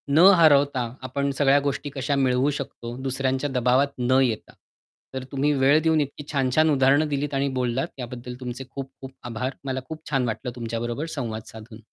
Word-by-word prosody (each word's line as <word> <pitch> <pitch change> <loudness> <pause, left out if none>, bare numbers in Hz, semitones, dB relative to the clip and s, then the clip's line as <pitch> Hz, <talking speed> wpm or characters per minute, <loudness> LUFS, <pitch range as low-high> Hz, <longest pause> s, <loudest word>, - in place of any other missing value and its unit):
न - - +6 0.2
हरवता, 140 -5 +4 0.2
आपण 140 +2 -1
सगळ्या 140 0 +5
गोष्टी 145 +1 -4
कशा 140 +1 -1
मिळवू 130 +3 +2
शकतो, 120 -3 -7
दुसऱ्यांच्या 130 +2 -1
दबावात 125 +2 +2 0.2
न 130 - +5
येता. 115 -4 -2 0.6
तर 130 -1 -4
तुम्ही 140 +2 +1
वेळ 140 +3 +5
देऊन 160 -1 +3
इतकी 145 +1 -5
छान-छान 140 +3 +2
उदाहरणं 140 +2 +4
दिलीत 145 0 -2
आणि 135 +1 +1
बोललात 125 +1 0
त्याबद्दल 125 -1 -7
तुमचे 125 0 -6
खूप-खूप 135 0 -8 0.2
आभार. 125 +4 -3
मला 130 -1 -2
खूप 160 0 -7
छान 135 -4 +1
वाटलं, 125 +3 -3
तुमच्याबरोबर 120 +3 -3
संवाद 115 -5 -3
साधून. 110 0 -11
135 Hz, 165 wpm, -24 LUFS, 125-140 Hz, 0.6 s, न